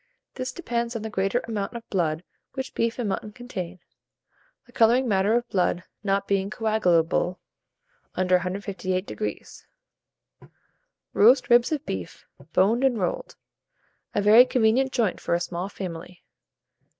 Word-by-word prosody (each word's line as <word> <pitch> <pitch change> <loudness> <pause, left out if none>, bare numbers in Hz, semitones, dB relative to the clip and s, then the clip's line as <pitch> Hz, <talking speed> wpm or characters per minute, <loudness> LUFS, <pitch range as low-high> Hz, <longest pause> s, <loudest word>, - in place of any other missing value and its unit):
This 255 0 -4
depends 235 -8 -3
on 225 - -4
the 220 - -5
greater 195 +5 0
amount 215 -1 -3
of 235 -1 -8
blood 165 -3 0 0.3
which 265 -1 -5
beef 230 0 -1
and 240 -4 -2
mutton 205 +2 -3
contain, 190 -7 -6 0.9
the 245 - -20
colouring 240 +2 +3
matter 200 +1 +2
of 240 0 0
blood 180 -1 0 0.2
not 195 0 0
being 195 0 0
coagulable 180 -5 +1 0.8
under 185 0 +3
158°. 185 - -4 1.5
ROAST 250 +5 +5
RIBS 240 +3 +5
OF 305 -3 -2
BEEF, 95 -3 -6 0.3
Boned 220 +9 +3
and 260 -3 +3
Rolled 180 -4 -3 0.8
(a 205 - +1
very 215 +4 +8
Convenient 250 +1 +2
Joint 230 -7 0
for - - 0
a - - 0
Small 175 +2 -4
Family). 180 -2 -8
205 Hz, 135 wpm, -25 LUFS, 185-235 Hz, 1.5 s, very